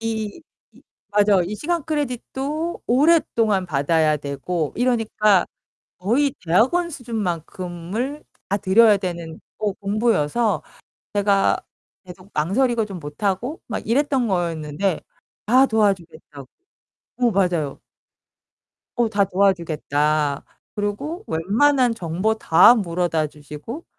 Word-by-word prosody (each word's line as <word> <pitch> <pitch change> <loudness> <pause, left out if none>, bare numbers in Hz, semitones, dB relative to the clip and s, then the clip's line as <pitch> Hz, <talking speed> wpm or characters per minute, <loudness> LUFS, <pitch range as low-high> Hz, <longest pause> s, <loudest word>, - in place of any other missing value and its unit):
이 220 +4 -4 0.3
이 - - -20 0.3
맞아 205 -2 +4
이 200 +5 -4
시간 330 +4 -2
크레딧도 295 +2 -3
오랫동안 235 - +2
받아야 155 0 +2
되고 145 +3 -3
이러니까 220 -6 +2 0.5
거의 255 +9 +1
대학원 260 - +2
수준만큼을 205 - -4 0.3
다 200 - +1
들여야 205 +1 +5
되는 170 -3 -6 0.2
어 210 -2 -1
공부여서 215 0 0 0.5
제가 200 -1 +2 0.5
계속 180 +2 -13
망설이고 225 - +1
좀 195 -3 -7
못하고 195 - -3
막 220 - -5
이랬던 265 +1 +1
거였는데 170 -1 -1 0.5
다 255 +4 +5
도와주겠다고 170 - -2 0.7
어 240 - +4
맞아요. 175 -8 0 1.2
어 240 -2 +2
"다 205 -2 +2
도와주겠다." 155 -6 0 0.3
그러고 275 - -3
웬만한 235 - +2
정보 180 +4 -1
다 220 +3 +6
물어다 170 -6 -1
주시고 150 - -9
200 Hz, 245 characters per minute, -22 LUFS, 170-240 Hz, 1.2 s, 다